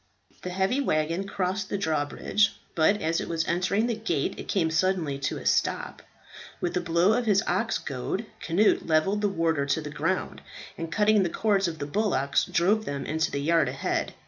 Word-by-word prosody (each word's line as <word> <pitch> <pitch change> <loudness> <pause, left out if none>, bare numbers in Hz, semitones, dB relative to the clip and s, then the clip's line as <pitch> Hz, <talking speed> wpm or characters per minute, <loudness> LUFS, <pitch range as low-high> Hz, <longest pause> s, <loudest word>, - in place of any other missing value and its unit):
The 180 - -5
heavy 190 +9 0
waggon 165 - 0
crossed 190 0 -2
the - - -1
drawbridge, 160 +5 0 0.2
but 200 +6 +2
as 165 +1 0
it - - -6
was 165 -1 -1
entering 185 +5 +1
the 240 - 0
gate 195 -10 -1
it - - -7
came 165 -5 +1
suddenly 160 -4 0
to - - -2
a - - -9
stop. - - 0 0.6
With 175 - -2
a 180 - +1
blow 170 +4 +3
of 240 0 0
his 200 -1 +3
ox 225 -1 0
goad 145 - -4 0.2
Cnut 185 +6 +2
levelled 175 +7 +2
the 205 - +2
warder 165 -6 0
to 145 - +1
the 150 -2 -6
ground, 165 +5 -2 0.3
and 165 0 -6
cutting 210 +2 +3
the 180 - +1
cords 200 +1 +1
of 165 -1 -4
the 145 - -4
bullocks, 145 -5 +1
drove 210 +5 +1
them 140 -1 -4
into 160 +1 0
the 140 - -3
yard 160 -2 +2
ahead. 135 +1 -2
175 Hz, 195 wpm, -27 LUFS, 155-200 Hz, 0.6 s, blow